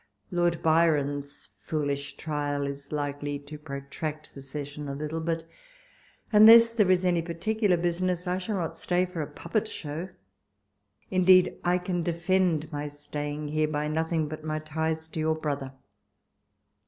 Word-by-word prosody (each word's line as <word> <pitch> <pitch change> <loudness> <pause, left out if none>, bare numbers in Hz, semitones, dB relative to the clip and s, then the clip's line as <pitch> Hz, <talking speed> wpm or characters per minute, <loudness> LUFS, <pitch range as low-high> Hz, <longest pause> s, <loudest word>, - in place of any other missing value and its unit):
Lord 175 -1 +1
Byron's 145 -3 +1
foolish 145 -2 -3
trial 145 -2 -2
is 140 0 -6
likely 145 -1 -2
to 145 +1 -10
protract 150 +1 -6
the 135 - -9
session 145 +1 -6
a 140 - -3
little; 155 +3 -3
but 165 0 -1 0.9
unless 230 +2 +9
there 210 -5 +3
is 185 0 +3
any 175 -2 +3
particu 205 +6 -1
lar 180 - +5
business, 175 +1 0
I 180 +1 0
shall 205 +3 -3
not 165 -3 -2
stay 180 +2 +1
for 180 -3 -5
a 150 - -3
puppet 215 -1 -2
show. 160 0 -5 1.0
Indeed, 185 -1 +5
I 175 +1 +3
can 180 -1 -2
defend 170 -1 +1
my 145 0 -3
staying 145 0 -5
here 155 +1 +1
by 150 0 -1
nothing 160 0 0
but 155 +1 -7
ray 155 0 -2
ties 160 +1 -2
to 160 - -5
your 160 0 +1
brother. 145 -4 -3
160 Hz, 155 wpm, -28 LUFS, 145-175 Hz, 1.0 s, unless